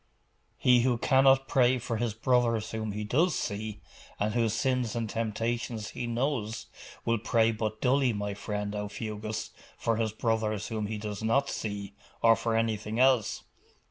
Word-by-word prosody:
'He 125 -1 +5
who 125 -1 +2
cannot 135 +1 +4
pray 130 -1 +4
for 115 -1 -3
his 110 -2 -1
brothers 115 -2 +1
whom 110 -1 -3
he 105 +1 -4
does 155 - +2
see, 105 +1 -4 0.4
and 105 +1 0
whose 115 -2 +1
sins 125 -1 0
and 115 -1 -1
temptations 115 0 -2
he 120 - -4
knows, 120 -2 -1 0.4
will 115 -1 +2
pray 115 0 +3
but 110 -1 -3
dully, 130 0 +3
my 105 -1 -3
friend 105 0 -4
Aufugus, 105 +1 -4 0.3
for 115 -1 0
his 110 -1 0
brothers 110 -2 -1
whom 110 -2 -2
he 110 0 -3
does 105 -1 -5
not 135 +6 +2
see, 100 -2 -4 0.3
or 115 0 +7
for 115 0 -1
anything 110 0 -1
else. 130 -4 +3
115 Hz, 160 wpm, -29 LUFS, 105-120 Hz, 0.4 s, or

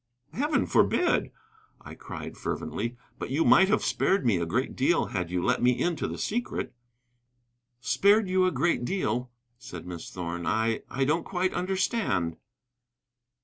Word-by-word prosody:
"Heaven 290 - +1
forbid!" 350 - +2 0.5
I - - -11
cried - - -8
fervently; 120 +1 -4 0.2
"but - - -4
you 145 +5 +1
might 190 - +6
have 210 - +2
spared 195 0 +1
me 110 -6 +3
a 85 -1 -2
great 125 +10 -1
deal 150 +6 +2
had 90 -3 -2
you 90 0 -1
let 125 0 +1
me 125 0 +3
into 175 -2 0
the - - -5
secret." 240 +3 -3 1.1
"Spared 200 - +3
you 185 0 +3
a - - +1
great 170 -8 +1
deal," 125 - -1 0.3
said 85 -8 -9
Miss 85 -2 -7
Thorn. 85 -1 -5
"I 110 +4 +1
I 135 +3 0
don't 160 +4 +1
quite 185 0 -1
understand." 185 - 0
135 Hz, 150 wpm, -27 LUFS, -, 1.1 s, might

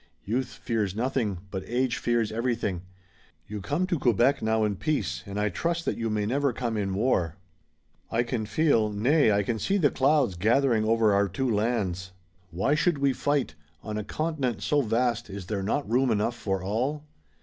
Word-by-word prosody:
Youth 125 +5 -2
fears 105 -5 -2
nothing, 115 -6 -1
but 95 -1 -4
age 125 +1 0
fears 120 -3 0
everything. 115 -5 -1 0.6
You 105 +1 -6
come 145 - 0
to 175 -4 -1
Quebec 125 +3 +3
now 110 0 +1
in 105 -2 0
peace, 100 - -1
and 100 +1 -4
I 105 0 +1
trust 170 +7 -2
that - - 0
you 115 -1 -2
may 105 -1 0
never 135 +3 +1
come 115 -1 -2
in 100 -2 -1
war. 95 -8 +1 0.7
I 115 +1 +1
can 120 -3 -3
feel, 115 -7 +2
nay 120 +5 +3
I 100 0 +2
can 110 +2 -2
see 195 - +1
the 150 -7 +3
clouds 135 -5 +2
gathering 110 +4 +2
over 110 -1 +3
our 100 0 +3
two 130 +9 -2
lands. 100 -4 -1 0.4
Why 95 - 0
should 160 +1 +2
we 140 -1 +2
fight? 140 - 0 0.3
On 110 -1 -5
a 105 - -2
continent 145 -5 -2
so 145 -1 +2
vast 120 -1 0
is 100 -1 -7
there 100 0 -2
not 125 +9 -1
room 125 +3 +2
enough 110 +2 +1
for 95 -5 -2
all?" 130 +10 -1
115 Hz, 185 wpm, -27 LUFS, 105-135 Hz, 0.7 s, Quebec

